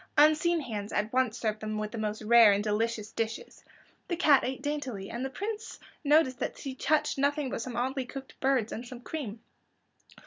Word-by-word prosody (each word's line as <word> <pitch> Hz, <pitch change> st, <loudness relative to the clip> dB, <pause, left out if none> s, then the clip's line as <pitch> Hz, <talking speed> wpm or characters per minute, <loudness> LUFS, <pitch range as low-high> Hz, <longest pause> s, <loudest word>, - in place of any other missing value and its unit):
Unseen 310 Hz, +3 st, +5 dB
hands 210 Hz, -6 st, -5 dB
at 210 Hz, +2 st, -1 dB
once 255 Hz, -3 st, +2 dB
served 215 Hz, -2 st, -1 dB
them 215 Hz, 0 st, -3 dB
with 215 Hz, 0 st, -3 dB
the -, -, -6 dB
most 215 Hz, 0 st, -3 dB
rare 225 Hz, -1 st, +7 dB
and 200 Hz, +1 st, 0 dB
delicious 220 Hz, 0 st, -1 dB
dishes. 225 Hz, -1 st, -4 dB, 0.4 s
The 345 Hz, -, -1 dB
cat 305 Hz, -5 st, +5 dB
ate 260 Hz, +1 st, -3 dB
daintily, 265 Hz, -10 st, -3 dB
and 240 Hz, +2 st, -4 dB
the 265 Hz, -, -2 dB
Prince 430 Hz, +8 st, -5 dB, 0.3 s
noticed 290 Hz, -3 st, +4 dB
that -, -, -3 dB
she 270 Hz, -, -5 dB
touched 300 Hz, +1 st, +1 dB
nothing 285 Hz, -1 st, +1 dB
but -, -, -3 dB
some 245 Hz, 0 st, -5 dB
oddly 260 Hz, +2 st, -1 dB
cooked 270 Hz, +1 st, -9 dB
birds, 260 Hz, -5 st, +1 dB
and 230 Hz, -, -5 dB
some 245 Hz, 0 st, -9 dB
cream. 240 Hz, -6 st, -5 dB
250 Hz, 195 wpm, -29 LUFS, 220-285 Hz, 0.4 s, rare